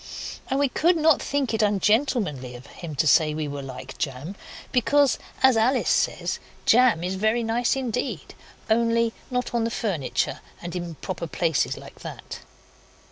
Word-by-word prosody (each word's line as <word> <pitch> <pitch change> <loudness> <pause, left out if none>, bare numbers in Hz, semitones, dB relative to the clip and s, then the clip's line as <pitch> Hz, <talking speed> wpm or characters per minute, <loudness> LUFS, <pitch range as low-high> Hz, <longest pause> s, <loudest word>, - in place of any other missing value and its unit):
And 270 - +1
we 285 - +4
could 335 +7 +2
not 315 -1 +4
think 275 -4 -1
it 220 - +1
ungentlemanly 205 - +1
of 120 +2 -11
him 160 0 -8
to 140 - +1
say 155 0 +4
we 155 -1 -2
were 140 0 -5
like 130 -2 -9
jam, 140 +7 -4 0.4
because, 280 +2 +3 0.2
as 265 -2 +7
Alice 245 +4 +2
says, - - 0 0.3
jam 235 -8 +5
is 180 +1 -1
very 220 +5 +1
nice 230 +3 +1
indeed 245 - -3 0.3
only 230 0 +2 0.2
not 250 -1 -2
on 230 -1 +1
furniture 190 - -1 0.2
and 175 0 -6
improper 175 0 -5
places 165 -2 0
like - - -12
that. - - -8
220 Hz, 150 wpm, -25 LUFS, 165-250 Hz, 0.4 s, as